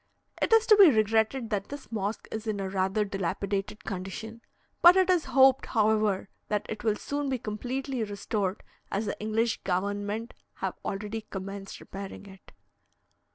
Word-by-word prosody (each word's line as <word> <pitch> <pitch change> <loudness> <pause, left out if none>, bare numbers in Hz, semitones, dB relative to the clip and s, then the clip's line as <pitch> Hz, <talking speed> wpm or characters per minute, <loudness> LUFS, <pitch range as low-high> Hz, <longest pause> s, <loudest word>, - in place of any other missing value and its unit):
It - - +1
is 450 0 +6
to 430 - +7
be 395 -5 +10
regretted 220 +1 +2
that 200 -2 -2
this 285 -3 -9
mosque 210 0 -3
is 220 +1 -5
in 210 -2 -1
a 195 - -2
rather 195 +2 +1
dilapidated 195 +2 -3
condition; 220 +4 -6 0.4
but 345 +1 +9
it 375 -1 +4
is 350 -3 +2
hoped, 265 -1 +5
however, 215 -3 +2 0.2
that 210 -1 -1
it 215 - -6
will 215 -2 +2
soon 285 +4 -3
be 260 - 0
completely 245 +3 -3
restored, 205 -1 -2 0.3
as 205 +3 -1
the - - -4
English 220 +2 0
government 205 +4 -2 0.2
have - - -3
already 210 +3 -3
commenced 195 0 -6
repairing 195 +1 -8
it. 190 -1 -15
215 Hz, 155 wpm, -28 LUFS, 200-235 Hz, 0.4 s, be